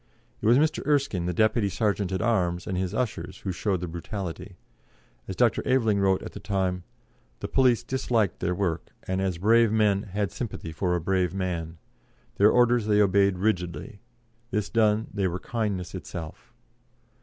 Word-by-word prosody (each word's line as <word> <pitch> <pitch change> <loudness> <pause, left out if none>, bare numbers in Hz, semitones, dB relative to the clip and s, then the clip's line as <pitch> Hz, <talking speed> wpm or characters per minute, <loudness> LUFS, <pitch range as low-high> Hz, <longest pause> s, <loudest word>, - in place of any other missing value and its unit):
It - - 0
was 120 +2 +6
Mr. 155 +2 +1
Erskine, 140 - +1
the - - 0
Deputy 110 +2 +2
Serjeant 100 -1 -1
at 95 - -1
Arms, 90 -7 0
and 95 - -3
his 90 0 -1
ushers, 115 +1 -3
who 95 - -3
showed 95 0 -1
the 90 - -3
brutality; 85 +1 -6 0.7
as - - -5
Dr. - - +2
Aveling 115 -6 +2
wrote 95 -1 +2
at - - -7
the - - -9
time: 95 -2 -1 0.6
"The - - -4
police 125 -3 +3
disliked 115 -6 0
their 90 - -1
work, 85 -4 -2 0.2
and, 95 +1 -2
as 95 -3 -1
brave 115 +4 +4
men, 105 -3 +3
had 100 0 -2
a - - -23
sympathy 105 -8 -5
for 90 +3 -1
a - - 0
brave 95 +2 0
man. 85 -3 -3 0.6
Their 105 +2 +6
orders 120 -2 +3
they 105 -1 +3
obeyed 100 -1 +3
rigidly. 100 +2 -2 0.5
This 105 -4 -2
done, 110 -1 +3
they 100 -2 0
were 90 0 -2
kindness 100 -5 -3
itself." 80 -3 -8
100 Hz, 175 wpm, -26 LUFS, 90-110 Hz, 0.7 s, was